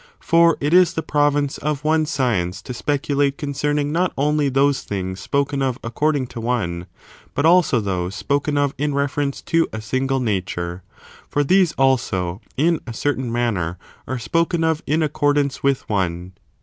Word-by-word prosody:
For 170 0 +4
it 145 +3 0
is 180 -1 +6
the 160 - -3
province 145 -2 +1
of 150 -1 -2
one 155 0 +2
science 95 - -1
to 125 - -6
speculate 140 +1 0
concerning 145 0 -1
not 180 +3 +1
only 150 +1 +2
those 135 0 +2
things 95 -1 -4
spoken 140 0 -1
of 130 -2 0
according 145 +3 0
to 115 - -5
one, 90 -8 -2 0.5
but 145 - +1
also 165 -7 +5
those 95 -2 -2
spoken 145 +4 -1
of 145 -1 +1
in 145 -1 0
reference 140 0 -1
to 165 -1 +2
a 110 - -5
single 130 +5 -1
nature. 95 -6 -2 0.5
For 145 - +1
these, 180 +2 +3
also, 100 -9 0 0.2
in 165 +4 +2
a 120 - -5
certain 130 -2 -1
manner, 100 -8 -1 0.3
are 130 - -2
spoken 165 +8 0
of 160 -1 +1
in 155 +2 +2
accordance 145 -2 +1
with 140 -1 0
one. 90 -3 -2
140 Hz, 160 wpm, -21 LUFS, 115-150 Hz, 0.5 s, is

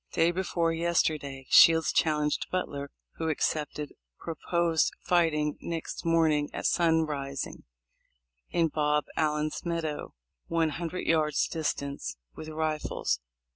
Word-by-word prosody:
Day 165 +1 +3
before 175 -2 0
yesterday 155 -5 0
Shields 165 -1 +7
challenged 150 -2 +1
Butler, 140 -6 -3 0.3
who 160 -1 -1
accepted, 150 -1 -2 0.2
pro 165 - -5 0.2
posed 170 -2 +2
fighting 155 -4 +1
next 165 0 -5
morning 160 -3 +3
at - - -4
sunrising 155 -5 0 0.8
in 165 -2 +2
Bob 150 0 +1
Allen's 150 -1 0
meadow, 165 -3 -3 0.3
one 165 -1 +1
hundred 170 +3 -4
yards 155 -2 +2
distance, 140 - -3 0.2
with 155 - -8
rifles. 155 - -1
160 Hz, 110 wpm, -29 LUFS, 150-165 Hz, 0.8 s, Shields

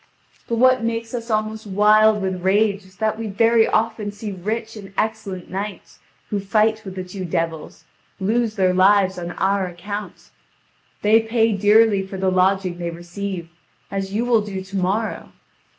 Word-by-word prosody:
But 235 - -1
what 255 +1 +4
makes 230 0 -3
us 235 -1 -5
almost 215 0 -2
wild 210 +1 +4
with 185 -1 -2
rage 200 +1 +2
is 185 0 -19
that 215 +3 -1
we 225 - -3
very 225 +2 +3
often 220 -1 0
see 210 0 -6
rich 220 +5 -4
and 200 -2 -10
excellent 215 -4 -3
knights, 200 +2 -6 0.3
who 205 - 0
fight 215 +2 +1
with 190 -2 -8
the 185 - -4
two 185 +1 -7
devils, 165 -2 -4 0.3
lose 220 +3 0
their 185 -3 +2
lives 190 0 +4
on 175 0 -5
our 195 0 0
account. 200 +4 -7 0.7
They 215 +2 +6
pay 225 0 +1
dearly 210 0 +4
for 190 0 -7
the 190 0 +1
lodging 185 -1 +1
they 170 -1 -3
receive, 175 +1 -6 0.4
as 195 -1 -3
you 220 +4 -1
will 235 -3 +3
do 195 -2 -5
to 190 +1 -10
morrow. 195 +4 -2
205 Hz, 165 wpm, -21 LUFS, 190-220 Hz, 0.7 s, They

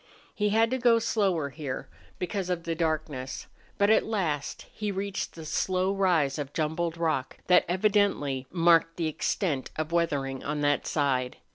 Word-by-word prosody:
He 210 0 0
had 225 +2 +3
to 260 - 0
go 235 -1 +5
slower 195 -9 +1
here, 140 -3 -5 0.3
because 185 0 -3
of 175 -2 -1
the 165 - -2
darkness. 155 -5 -2 0.3
But 200 +1 +4
at - - +5
last 170 -10 -2
he 210 -1 -3
reached 195 0 -3
the 160 -1 -8
slow 185 +4 0
rise 170 -8 +2
of 145 -1 -5
jumbled 160 +1 -1
rock 155 -6 -1
that 180 - +5
evidently 185 -9 +1
marked 165 -1 +3
the 170 - -1
extent 155 -2 -1
of 155 +1 -3
weathering 140 -6 0
on 150 0 -2
that 145 0 +1
side. 130 -4 0
165 Hz, 160 wpm, -28 LUFS, 145-195 Hz, 0.3 s, go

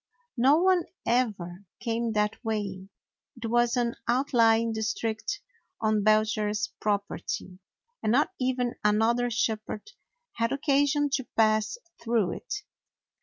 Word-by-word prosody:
No 270 +5 +5
one 365 0 +3 0.2
ever 205 -6 -1
came 230 0 -1
that 210 +2 0
way; 200 -4 -3 0.5
it 235 - -6
was 240 +1 +2
an 235 -1 +1
outlying 230 -3 +3
district 220 - -2 0.4
on 215 -1 +2
Belcher's 215 0 +2
property, 200 -2 -3 0.4
and 215 - +1
not 270 +5 +3
even 255 -1 0
another 225 +4 +3
shepherd 220 - -2 0.5
had 230 0 +1
occasion 285 +1 +2
to 265 -3 -1
pass 215 - +3 0.2
through 225 -6 +1
it. - - -9
225 Hz, 115 wpm, -28 LUFS, 215-245 Hz, 0.5 s, No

